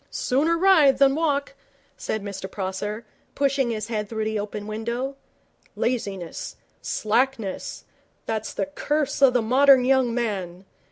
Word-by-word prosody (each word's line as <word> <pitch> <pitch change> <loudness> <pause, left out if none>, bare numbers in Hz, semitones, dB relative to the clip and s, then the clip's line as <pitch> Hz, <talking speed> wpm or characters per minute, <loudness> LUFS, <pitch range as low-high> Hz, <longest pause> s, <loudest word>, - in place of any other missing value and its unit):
'Sooner 310 +6 +1
ride 325 -8 +5
than 275 0 +5
walk,' 285 -3 0 0.4
said 215 -2 -4
Mr 195 -1 -6
Prosser, 205 +4 -4 0.3
pushing 275 -2 +1
his 215 -2 -3
head 210 -3 -3
through 220 -1 -2
the 220 -1 -1
open 205 0 -5
window. 235 +5 -3 0.6
'Laziness 200 -8 -3 0.3
slackness 225 -2 -1 0.4
that's 220 -1 -3
the - - -2
curse 290 0 -2
of 260 -2 +6
the 245 - +3
modern 260 +2 +5
young 260 -2 +3
man. 195 -6 -3
235 Hz, 130 wpm, -24 LUFS, 210-275 Hz, 0.6 s, of